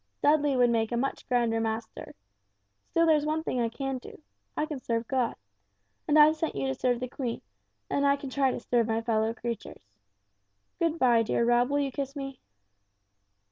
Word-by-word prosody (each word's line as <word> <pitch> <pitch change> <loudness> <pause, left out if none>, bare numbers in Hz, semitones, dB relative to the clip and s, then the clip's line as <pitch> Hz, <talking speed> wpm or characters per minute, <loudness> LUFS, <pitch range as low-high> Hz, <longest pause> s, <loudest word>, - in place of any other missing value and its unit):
Dudley 290 -2 +3
would 245 -1 +4
make 225 -1 0
a 240 - 0
much 270 +3 -3
grander 235 -2 +2
master. 220 0 -4 0.7
Still 335 - +3
there's 310 -2 +4
one 310 +1 -1
thing 255 -6 -1
I 230 - +1
can 270 +2 -4
do. - - -12 0.4
I 305 - +1
can 300 -3 -5
serve 230 -2 -2
God 255 -3 0 0.7
and 300 - +4
I've 305 +1 +7
sent 320 0 -3
you 135 - -2
to 135 - 0
serve 245 - 0
the 255 - -3
Queen, 245 -2 -4 0.4
and 280 - 0
I 280 0 +4
can 280 -2 -8
try 270 0 +2
to - - -3
serve 235 -2 +1
my 225 0 0
fellow 220 -1 +1
creatures. 230 - -6 1.0
Good 335 -1 +1
bye, 240 -5 +4
dear 230 +1 +1
Rob, 240 +1 +3
will 285 - +1
you 275 -1 -1
kiss 275 +1 -4
me." 275 -2 -6
255 Hz, 190 wpm, -28 LUFS, 230-285 Hz, 1.0 s, I've